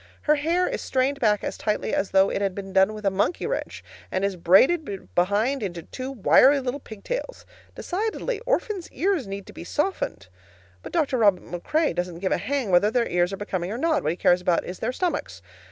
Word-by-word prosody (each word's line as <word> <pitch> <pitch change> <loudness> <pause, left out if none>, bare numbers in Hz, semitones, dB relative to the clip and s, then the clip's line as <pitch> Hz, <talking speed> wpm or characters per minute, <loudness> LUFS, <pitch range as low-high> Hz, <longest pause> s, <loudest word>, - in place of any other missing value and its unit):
Her 300 - +4
hair 335 +5 +1
is - - -3
strained 265 +2 0
back 210 -4 +2
as - - -4
tightly 210 -1 -1
as 195 - 0
though 190 0 +4
it - - -2
had 195 -2 -1
been 195 -1 -7
done 190 +3 +4
with 210 -1 -8
a 195 - +3
monkey 200 - 0
wrench, - - -4 0.3
and 185 +1 0
is 200 -1 -1
braided 195 - +2
behind 210 +9 +1
into 175 -5 -4
two 260 +8 -6
wiry 270 +3 +5
little 260 +1 -3
pigtails. 395 - -6 0.3
Decidedly, 435 +4 -3
orphans' 425 -7 -1
ears 365 - 0
need 195 0 -6
to - - -13
be - - -9
softened. 235 - -2 0.5
But - - -9
Dr. 285 -6 +1
Robin 200 -6 +2
MacRae 300 - 0
doesn't 175 -1 -3
give 190 +2 -2
a - - +1
hang 245 +1 -2
whether 180 +4 +5
their 235 +1 +1
ears 175 +1 +1
are 195 - -4
becoming 185 -3 -3
or 225 - -3
not; 315 +3 +1
what 155 - 0
he - - -3
cares 180 0 +3
about 180 -2 +1
is 180 - -7
their 230 - -1
stomachs. 255 - -3
210 Hz, 210 wpm, -25 LUFS, 185-285 Hz, 0.5 s, wiry